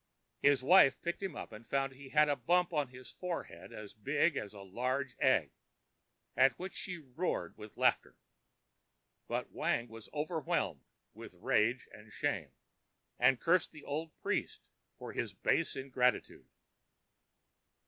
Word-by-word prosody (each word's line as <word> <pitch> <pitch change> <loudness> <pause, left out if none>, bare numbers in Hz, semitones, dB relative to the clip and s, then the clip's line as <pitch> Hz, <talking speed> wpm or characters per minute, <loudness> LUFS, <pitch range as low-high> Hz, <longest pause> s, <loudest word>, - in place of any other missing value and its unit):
His 140 -2 +4
wife 140 -3 +7
picked 170 +2 -2
him 190 -6 -3
up - - -7
and 110 +1 -10
found 135 +1 0
he 135 0 -12
had 150 +1 +5
a 145 - +2
bump 175 +7 +2
on 145 -3 +1
his 125 0 -12
forehead 100 - -6
as 105 -1 -9
big 145 +8 +1
as 100 - -4
a 100 -2 -11
large 125 +7 -2
egg, 95 - +3 0.8
at 135 -2 +5
which 185 +1 -6
she 180 -1 -5
roared 155 +3 -3
with 105 -1 -11
laughter; - - +2 1.1
but - - -3
Wang 120 0 0
was 115 -1 -11
overwhelmed 155 0 -1 0.3
with - - -11
rage 120 +4 +1
and 105 0 -13
shame, - - -2 0.7
and 125 0 +5
cursed 175 0 +2
the 155 - -12
old 155 +3 -3
priest - - -1 0.4
for - - -8
his - - -3
base - - +1
ingratitude. 130 -2 0
135 Hz, 145 wpm, -34 LUFS, 120-155 Hz, 1.1 s, wife